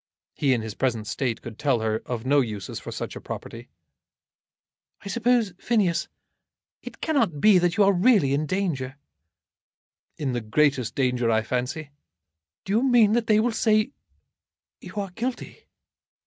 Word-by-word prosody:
He 140 - +1
in 115 - -3
his 110 -1 -5
present 115 -4 -1
state 115 +2 -3
could 115 -3 -9
tell 135 -6 +1
her 110 0 -1
of 120 -1 -4
no 145 +2 +4
uses 105 -6 -5
for - - -8
such - - -5
a - - -8
property. 115 +2 -8 1.3
"I 200 - -8
suppose, 235 -3 +1
Phineas, 205 -8 +1 0.7
it - - -11
cannot 230 - +1
be 205 +2 +6
that 175 -1 0
you 210 - +6
are 200 0 +4
really 180 - +4
in 150 +2 0
danger?" 145 -7 -2 1.2
"In 135 -4 -2
the 120 - -2
greatest 130 +2 +1
danger, 125 -3 +1
I 110 -1 +2
fancy." 135 +6 -3 0.7
"Do 195 - -2
you 225 - +3
mean 240 -5 +4
that 235 -1 +1
they 215 -1 +4
will 235 +2 +2
say 215 +2 +2 0.9
you - - -11
are 200 -2 -3
guilty?" 240 +6 -5
150 Hz, 160 wpm, -25 LUFS, -, 1.3 s, be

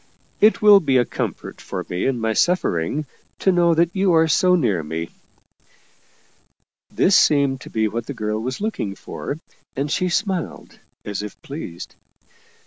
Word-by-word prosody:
" - - -38
It 220 - -1
will 205 -1 +9
be 140 -7 +2
a 120 - +3
comfort - - -5
for - - -5
me 90 +6 -2
in 130 -3 -1
my 110 0 0
suffering, 150 - 0 0.3
to 190 - +2
know 170 -2 +3
that 170 +1 +1
you 190 -2 +2
are 160 0 +4
so 180 +4 +4
near 110 - +1
me." 80 +2 -5 1.8
This 190 - +3
seemed 140 -3 +3
to - - -10
be 110 -1 0
what 115 +2 -4
the 140 - -5
girl 105 -1 -2
was 130 +2 -4
looking 200 - -3
for, 145 - -6 0.4
and 140 +2 -2
she 180 +3 0
smiled 185 -1 -3 0.3
as 105 -1 -4
if 105 -1 -8
pleased. 135 - -8
140 Hz, 165 wpm, -21 LUFS, 110-175 Hz, 1.8 s, will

